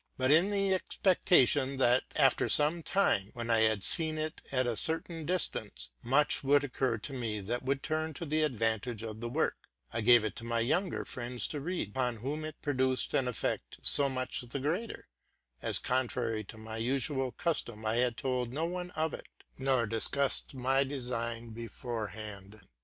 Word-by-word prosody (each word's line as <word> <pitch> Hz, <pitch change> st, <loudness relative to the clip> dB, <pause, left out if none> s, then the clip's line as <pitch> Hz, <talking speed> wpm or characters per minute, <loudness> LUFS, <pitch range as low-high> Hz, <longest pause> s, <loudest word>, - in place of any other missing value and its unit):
But 130 Hz, +1 st, +2 dB
in 165 Hz, +6 st, +5 dB
the 195 Hz, -1 st, +1 dB
expectation, 145 Hz, -8 st, +2 dB
that 125 Hz, -1 st, +3 dB
after -, -, +3 dB
some 150 Hz, +3 st, +4 dB
time, 155 Hz, -, +1 dB
when 120 Hz, -1 st, -3 dB
I 115 Hz, -, +4 dB
had 110 Hz, -3 st, +2 dB
seen 160 Hz, -1 st, +3 dB
itata 130 Hz, -6 st, -2 dB
certain 160 Hz, -, -4 dB
distance, 65 Hz, -, -3 dB
much 140 Hz, +6 st, +2 dB
would 145 Hz, +1 st, +3 dB
occur 130 Hz, -3 st, -1 dB
to 125 Hz, +6 st, -8 dB
me 115 Hz, -5 st, -3 dB
that 120 Hz, +5 st, -3 dB
would 135 Hz, +1 st, -2 dB
turn 155 Hz, -1 st, -2 dB
to 170 Hz, -, -6 dB
the 155 Hz, +1 st, 0 dB
advantage 115 Hz, -4 st, -1 dB
of 110 Hz, -1 st, -7 dB
the 120 Hz, +1 st, -5 dB
work, 150 Hz, +7 st, -2 dB, 0.3 s
I 115 Hz, -, -1 dB
gave 120 Hz, 0 st, +6 dB
it 110 Hz, -, -4 dB
to -, -, -6 dB
my 115 Hz, 0 st, -1 dB
younger 165 Hz, +10 st, -1 dB
friends 120 Hz, 0 st, -3 dB
to 150 Hz, -, -4 dB
read, 175 Hz, -, -3 dB
upon 125 Hz, +1 st, -1 dB
whom 140 Hz, +7 st, -4 dB
it 155 Hz, -1 st, -8 dB
produced 130 Hz, -2 st, 0 dB
an 130 Hz, -, +1 dB
effect 100 Hz, -, -3 dB
so 140 Hz, -1 st, +9 dB
much 130 Hz, -1 st, -3 dB
the 120 Hz, +2 st, -6 dB
greater, 165 Hz, -, -3 dB, 0.5 s
as, -, -, 0 dB
contrary 120 Hz, -3 st, -1 dB
to 110 Hz, -, -12 dB
my 110 Hz, 0 st, -8 dB
usual 130 Hz, +2 st, -1 dB
custom, 120 Hz, -11 st, -3 dB
I 110 Hz, +2 st, 0 dB
had 120 Hz, -1 st, +1 dB
told 125 Hz, -2 st, -2 dB
no 155 Hz, +5 st, -2 dB
one 180 Hz, +1 st, -4 dB
of 160 Hz, 0 st, -1 dB
it, -, -, -8 dB, 0.3 s
nor 130 Hz, -3 st, +2 dB
discovered 130 Hz, +6 st, +5 dB
my 135 Hz, +2 st, +2 dB
design 120 Hz, -4 st, -3 dB
beforehand. 110 Hz, -3 st, -7 dB
130 Hz, 175 wpm, -31 LUFS, 115-150 Hz, 0.5 s, so